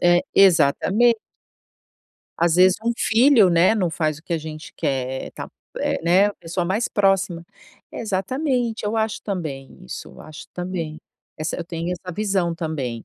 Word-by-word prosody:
É, 175 0 +4
exatamente. 195 +6 +4 1.2
Às 170 -1 +2
vezes 185 0 +6
um 235 - +2
filho, 230 -4 +5
né, 170 +5 +4
não 185 -6 0
faz 155 -2 -1
o - - -19
que 175 - -6
a 165 - +1
gente 155 0 -9
quer. 130 -1 -2
Ta - - -7 0.3
eh, - - -1
né, 180 +4 +4
a 205 - -3
pessoa 170 +2 -3
mais 200 +7 0
próxima. 195 -4 +1 0.5
Exatamente, 235 +3 -2
eu 215 +2 -1
acho 220 -1 -1
também 155 - -6
isso, 65 - -7
eu - - -14
acho 155 +2 -11
também. 175 -4 -4 0.4
Essa 155 +1 -3
eu 175 - -5
tenho 170 +1 -4
essa 180 0 -7
visão 190 -4 0
também. 140 -9 -4
180 Hz, 160 wpm, -22 LUFS, 160-205 Hz, 1.2 s, vezes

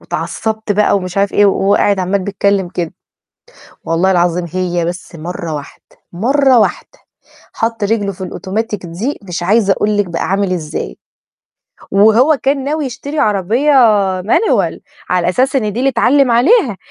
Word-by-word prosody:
"واتعصبت 220 -1 -3
بقى" 205 0 +2
ومش 185 -2 -5
عارف 200 0 +1
إيه 205 - +4
وهو 195 0 +2
قاعد 200 -1 +2
عمال 190 +2 0
بيتكلم 195 -1 0
كده، 175 -2 -4 0.9
والله 170 +4 +1
العظيم 175 -1 +1
هي 180 -2 -1
بس 175 0 -6
مَرّة 165 0 -5
واحدة، 145 -1 -9 0.3
مَرّة 260 +7 +3
واحدة، 215 - -1 0.6
حط 225 -1 -2
رجله 205 -1 0
في 190 - -12
الأوتوماتيك 205 +2 -4
دي 195 - -4
مش 180 -3 -5
عايزة 200 +1 +3
أقول 210 +2 -1
لِك 205 - +2
بقى 170 -2 -4
عامل 195 -1 0
إزاي. 150 - -5 0.9
وهو 220 +9 +4
كان 275 0 +1
ناوي 300 +2 -2
يشتري 275 +4 -5
عربية 215 +5 +1 0.5
مانيوال 425 - +1 0.3
على 180 -1 +1
أساس 260 +9 +1
إن 215 -6 0
دي 235 - -3
اللي 270 +2 +2
اتعلم 270 -1 +3
عليها، 250 - +3
200 Hz, 155 wpm, -15 LUFS, 180-235 Hz, 0.9 s, إيه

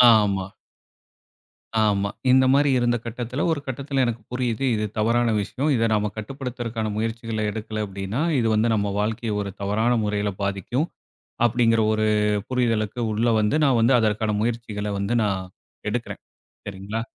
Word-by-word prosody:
ஆமா. 100 -3 +1 1.3
ஆமா. 100 -1 +2 0.2
இந்த 130 0 +6
மாரி 145 +1 +4
இருந்த 120 -1 +2
கட்டத்தில, 120 +4 -4
ஒரு 155 - 0
கட்டத்தில 135 +1 -1
எனக்கு 115 -1 -2
புரியுது, 125 -1 -1
இது 105 0 -1
தவறான 115 +1 +2
விஷயம் 135 +9 -2
இதை 115 -1 +2
நம்ம 105 0 +1
கட்டுப்படுத்துறத்துகான 120 -2 -4
முயற்சிகளை 115 0 -2
எடுக்கல 110 0 -4
அப்படின்னா, 100 +6 -4 0.2
இது 115 - +1
வந்து 110 +2 +2
நம்ம 100 -1 -1
வாழ்க்கையை 110 +1 -1
ஒரு 100 -1 -4
தவறான 110 +4 +1
முறையில 105 -1 0
பாதிக்கும் 100 - -1 0.6
அப்படிங்கிற 115 -1 +3
ஒரு 110 0 +1 0.4
புரிதலுக்கு 115 -3 0
உள்ள 115 +3 +1
வந்து, 105 +7 +2
நான் 125 -4 +3
வந்து 125 +3 +5
அதற்கான 110 -1 +1
முயற்சிகளை 110 -3 -2
வந்து 100 +5 0
நான், 95 -2 -2 0.4
எடுக்கிறேன் 120 +2 -4 0.4
சரிங்களா? 100 +3 -4
110 Hz, 140 wpm, -24 LUFS, 105-120 Hz, 1.3 s, இந்த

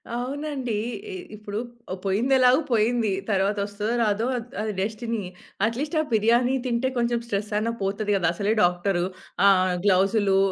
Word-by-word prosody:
అవునండి. 265 0 -3 0.4
ఇ - - -5 0.2
ఇప్పుడు 210 -1 -6 0.3
ఆహ్, 185 - -3
పోయింది 215 +8 +1
ఎలాగో 255 +2 +6
పోయింది. 225 -1 +2 0.2
తరువాతొస్తదో 205 +2 0
రాదో 215 +1 +1
అది 235 0 -6
అది 215 0 -2
డెస్టినీ. 225 +2 -2 0.5
అట్‌లీ‌స్ట్ 290 +8 -2
ఆ - - -1
బిర్యానీ 235 +4 +3
తింటే 245 +2 0
కొంచెం 235 0 +1
స్ట్రెస్ 205 -1 -2
అయినా 230 +2 0
పోతది 205 +2 -1
కదా! 175 -3 +1
అసలే 205 +4 +1
డాక్టరు. 175 0 +1 0.4
ఆహ్, 185 -2 +4
గ్లోవ్స్‌లు 195 +1 +3
215 Hz, 145 wpm, -25 LUFS, 200-240 Hz, 0.5 s, ఎలాగో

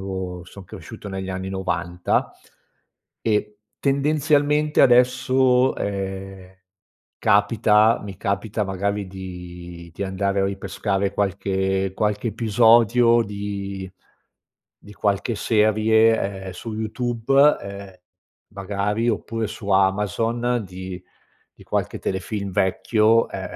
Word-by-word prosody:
avevo 95 -2 -5
son 95 +2 -12
cresciuto 105 - -10
negli 95 -1 -5
anni 95 0 -4
90, 90 -2 -1 0.9
e 105 -1 -1 0.2
tendenzialmente 150 +1 +2
adesso, 125 +1 +4
ehm, 95 -1 -5 0.6
capita 105 +2 +3
mi 100 -2 -8
capita 100 +2 -2
magari 100 +1 -2
di 90 -2 -9
di 100 - -4
andare 100 +1 -1
a - - +2
ripescare 100 0 -2
qualche 95 -1 -1
qualche 105 +2 -1
episodio 115 +2 +4
di 100 -2 -5 0.9
di 105 - -14
qualche 100 +3 -1
serie, 110 -2 +2
ehm, - - -5
su 110 +5 -7
YouTube, 120 +5 +2
ehm, 100 -1 -9 0.6
magari 100 +3 -1
oppure 115 0 -2
su 110 -1 -8
Amazon 105 +5 +1
di 95 0 -8 0.5
di - - -17
qualche - - -2
telefilm 100 +1 -3
vecchio, 110 +5 +2
ehm, - - -6
100 Hz, 100 wpm, -22 LUFS, 95-115 Hz, 0.9 s, adesso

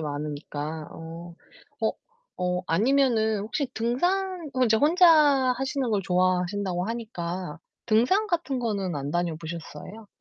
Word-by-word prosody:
많으니까. 150 +1 -5
어. 165 +1 -9 0.5
어. - - +1 0.5
어, 180 0 -1
아니면은 220 +2 +2
혹시 230 +7 -2
등산 350 +8 -1
이제 220 -1 +4
혼자 340 - +5 0.5
하시는 270 -1 -1
걸 200 -2 +1
좋아하신다고 180 0 0
하니까 180 -8 -5 0.3
등산 245 - +3
같은 330 -8 -1
거는 200 -7 -2
안 140 0 -4
다녀 175 -1 -1
보셨어요? 170 +6 -8
200 Hz, 265 characters per minute, -26 LUFS, 170-255 Hz, 0.5 s, 혼자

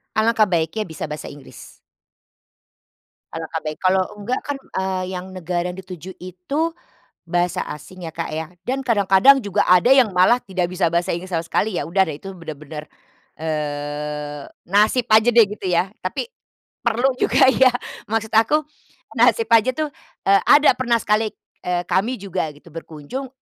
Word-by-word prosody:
Alangkah 220 0 +3
baiknya 170 +4 -1
bisa 160 -1 -6
bahasa 150 - -6
Inggris. 145 -2 -12 1.6
Alangkah 165 0 -4
baik, 155 -1 -6
kalau 185 0 +3
enggak 210 +5 -3
kan, 285 -1 -4 0.2
eee, 190 -1 -1
yang 185 +1 -7
negara 180 0 -2
dituju 185 -1 -9
itu 185 - -5 0.6
bahasa 175 +1 0
asing, 175 +5 -11
ya 160 - -6
Kak 165 0 -4
ya, 160 +2 -5 0.2
dan 270 +1 -1
kadang-kadang 225 +4 +5
juga 205 -2 0
ada 180 +5 +5
yang 260 -6 +5
malah 185 +7 +5
tidak 185 -3 -2
bisa 175 -2 0
bahasa 175 +1 +1
Inggris 185 +2 -8
sama 165 0 -1
sekali, 205 +1 0
ya 145 - -5
udah 190 +3 +3
deh 155 -5 -5
itu 195 - -9
benar-benar, 155 -2 -8 0.6
eee, 150 -1 -4 0.2
nasib 215 +5 +3
aja 220 +2 +5
deh 230 -1 +7
gitu 205 -1 -7
ya, 180 +2 +2 0.2
tapi 475 - -3 0.5
perlu 240 +3 +2
juga - - +4
ya. 265 -1 +5 0.4
Maksud 225 0 -2
aku 230 +8 +3 0.6
nasib 460 -2 +4
aja 230 +2 +5
tuh, 310 -1 -1 0.4
eee, 195 0 +5
ada 295 +1 +7
pernah 240 -2 +1
sekali, 215 0 +1 0.3
eee, 180 0 -2
kami 215 +9 0
juga 190 -5 -3
gitu 155 +1 -17
berkunjung 165 - -7
185 Hz, 155 wpm, -21 LUFS, 165-220 Hz, 1.6 s, deh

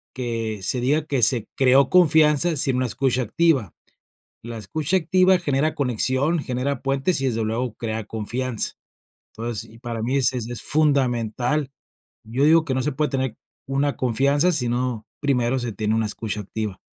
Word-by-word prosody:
que 115 -4 -3
se 125 +5 -1
diga 150 +4 +1
que 140 -5 -1
se 115 -2 +3
creó 130 0 +4
confianza 160 -2 +4
sin 135 -2 +1
una 130 0 0
escucha 130 +1 0
activa. 125 - +1 0.7
La 115 -1 -6
escucha 150 - -1
activa 185 +2 +3
genera 150 -1 0
conexión, 130 +5 +1
genera 130 0 -2
puentes 135 +5 0
y 135 - -2
desde 115 -3 -1
luego 115 +1 -2
crea 110 -1 -4
confianza. 115 +3 -3 0.6
Entonces, 115 0 -4
y 115 - -15
para 120 -2 -5
mí 125 +4 0
es 130 -2 +3
es 120 -2 -4
fundamental. 135 -1 +1 0.6
Yo 120 +5 -1
digo 160 +2 +5
que 135 - -1
no 130 - 0
se 150 - -1
puede 150 +2 -1
tener 130 -4 -2 0.3
una 140 +1 0
confianza, 140 +7 +2
sino 125 -5 -1 0.2
primero 130 -3 +1
se 120 -2 -3
tiene 110 +1 -1
una 110 0 +1
escucha 105 0 -3
activa. 105 -1 -5
130 Hz, 165 wpm, -23 LUFS, 115-145 Hz, 0.7 s, digo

